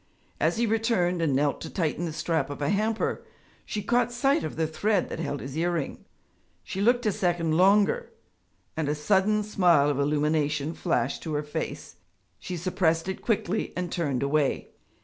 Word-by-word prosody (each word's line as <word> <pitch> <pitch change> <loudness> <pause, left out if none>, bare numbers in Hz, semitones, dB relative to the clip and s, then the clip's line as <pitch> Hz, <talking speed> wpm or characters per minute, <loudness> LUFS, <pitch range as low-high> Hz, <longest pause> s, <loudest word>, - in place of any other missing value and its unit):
As - - +1
he 235 - +2
returned 220 -6 +1
and 150 -5 +1
knelt 145 +1 +1
to - - -6
tighten 170 -1 -1
the 165 - -3
strap 160 0 -1
of 145 - -6
a 145 0 0
hamper, 215 +2 0 0.4
she 210 - -3
caught 240 +3 +2
sight 270 +4 +2
of 155 - -4
the 160 - 0
thread 195 +5 0
that - - -5
held 145 -4 -3
his 135 +1 -7
earring. 170 -2 -2 0.6
She 190 - -4
looked 245 +3 +3
a 215 - +3
second 175 -4 0
longer, 200 - +3 0.6
and 155 -2 -1
a 150 - 0
sudden 205 +7 +2
smile 175 -8 +3
of 140 - -2
illumination 150 +1 +1
flashed 125 -4 -1
to 155 -2 -4
her 150 - -1
face. 150 - -5 0.4
She 180 - -5
suppressed 170 -1 0
it 190 - -4
quickly 220 -2 -1
and 180 -1 -3
turned 140 -7 -1
away. 140 0 0
170 Hz, 175 wpm, -27 LUFS, 150-205 Hz, 0.6 s, looked